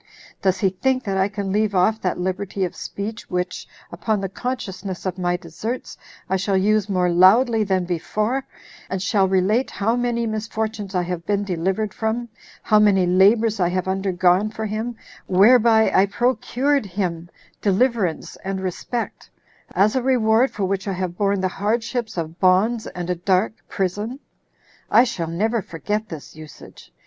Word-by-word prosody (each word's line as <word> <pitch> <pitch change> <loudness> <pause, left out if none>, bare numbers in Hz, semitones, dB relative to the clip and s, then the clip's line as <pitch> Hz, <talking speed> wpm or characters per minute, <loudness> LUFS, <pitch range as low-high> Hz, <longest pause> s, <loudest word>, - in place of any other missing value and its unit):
Does 190 -1 +2
he 195 - +4
think 260 +7 0
that 195 -2 -2
I 190 0 +2
can 200 -2 -4
leave 210 0 +1
off 215 +5 +2
that 180 - -1
liberty 190 +1 -2
of 175 - -6
speech, 215 +3 -6
which, 180 -1 -3 0.2
upon 220 -2 -1
the 195 -1 -3
consciousness 195 -6 -5
of 185 0 -3
my 175 0 0
deserts, 190 +8 -6 0.3
I 190 - +1
shall 195 0 0
use 210 +2 +2
more 180 -2 +1
loudly 220 +6 +5
than 190 -3 0
before, 215 +9 -1 0.5
and 190 - -2
shall 190 +1 +2
relate 195 +7 +2
how 225 +4 0
many 240 -1 0
misfortunes 215 -2 -3
I 180 - +2
have 175 -1 -4
been 205 -1 +1
delivered 190 +3 -1
from; 230 +2 -2 0.3
how 215 -1 +4
many 200 -3 +4
labors 205 +4 +4
I 175 -2 +2
have 185 +1 -2
undergone 190 +1 +2
for 220 0 -5
him, 220 +3 -3 0.3
whereby 220 +3 +5
I 195 - +5
procured 255 +3 0
him 175 -3 -3 0.3
deliverance 205 -4 0
and 195 0 -3
respect; 190 +6 -4 0.5
as 210 +4 +3
a 260 - +2
reward 245 -1 +3
for 200 - -3
which 195 +1 -2
I 195 - -1
have 180 -1 -3
borne 200 0 +1
the 190 - +2
hardships 220 +3 -2
of 165 +1 -4
bonds 205 +5 +3
and 175 -1 -6
a - - 0
dark 185 +4 +1 0.2
prison? 205 +7 -2 0.7
I 240 - +6
shall 235 -10 -3
never 215 +7 0
forget 210 +6 -4
this 155 -3 -9
usage. 155 -1 -13
200 Hz, 165 wpm, -22 LUFS, 185-220 Hz, 0.7 s, I